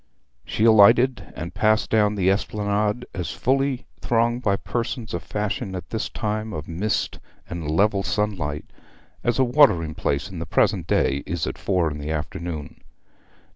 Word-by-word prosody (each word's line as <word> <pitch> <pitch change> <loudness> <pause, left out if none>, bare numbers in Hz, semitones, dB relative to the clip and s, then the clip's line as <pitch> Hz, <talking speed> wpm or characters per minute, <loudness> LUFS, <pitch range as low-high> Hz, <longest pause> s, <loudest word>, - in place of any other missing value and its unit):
She 105 - -2
alighted, 115 +4 +5
and - - -6
passed 110 +1 +2
down 105 -1 +3
the 95 -1 +3
esplanade, 105 +3 -1
as 90 -4 -3
fully 135 0 0
thronged 120 +1 +1
by 100 -5 +2
persons 120 +2 -4
of - - -2
fashion 105 -1 -3
at 90 - -7
this 110 - -2
time 110 0 -3
of 75 -5 -5
mist 95 +6 -2 0.3
and 85 -3 -5
level 100 +5 +2
sunlight 95 -9 -2 0.6
as 120 - +1
a 135 - +4
watering 120 - +4
place 70 -1 -1
in - - -8
the - - -5
present - - +1
day 70 +1 +2
is 85 -1 -2
at - - -5
four 90 -5 +1
in 75 - -6
the 75 +1 -5
afternoon. 80 -1 -5
105 Hz, 160 wpm, -23 LUFS, 85-115 Hz, 0.6 s, alighted